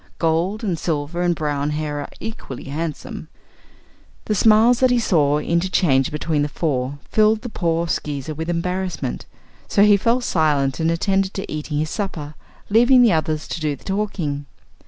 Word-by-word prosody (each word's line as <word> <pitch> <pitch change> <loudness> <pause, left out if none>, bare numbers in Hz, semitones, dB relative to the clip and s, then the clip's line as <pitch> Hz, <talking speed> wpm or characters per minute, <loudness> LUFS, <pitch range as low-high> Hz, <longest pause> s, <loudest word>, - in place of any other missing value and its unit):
Gold 170 +7 0
and 180 -7 -1
silver 155 +1 -2
and 175 -1 +2
brown 145 -2 -1
hair 150 -1 -3
are 145 - -6
equally 220 - -7
handsome." 155 +3 -5 1.0
The 215 - 0
smiles 220 +4 +5
that 255 - +4
he 245 - +3
saw 150 -10 +2
interchanged 170 -4 +1
between 150 0 -1
the 145 - 0
four 140 -4 -2
filled 215 0 +3
the 245 - -5
poor 170 -4 -1
Skeezer 150 -2 -3
with 160 +3 -5
embarrassment, 175 -4 -3 0.4
so 200 - +3
he 205 -1 +6
fell 230 +5 +2
silent 150 - +1
and 160 0 +1
attended 190 +3 0
to 195 - -5
eating 150 0 -3
his 155 +1 -1
supper, 160 -8 -4 0.3
leaving 245 +4 +5
the 225 -6 +5
others 155 -1 -1
to 170 - -4
do 150 -2 0
the - - -20
talking. 185 -8 -3
165 Hz, 165 wpm, -21 LUFS, 150-200 Hz, 1.0 s, he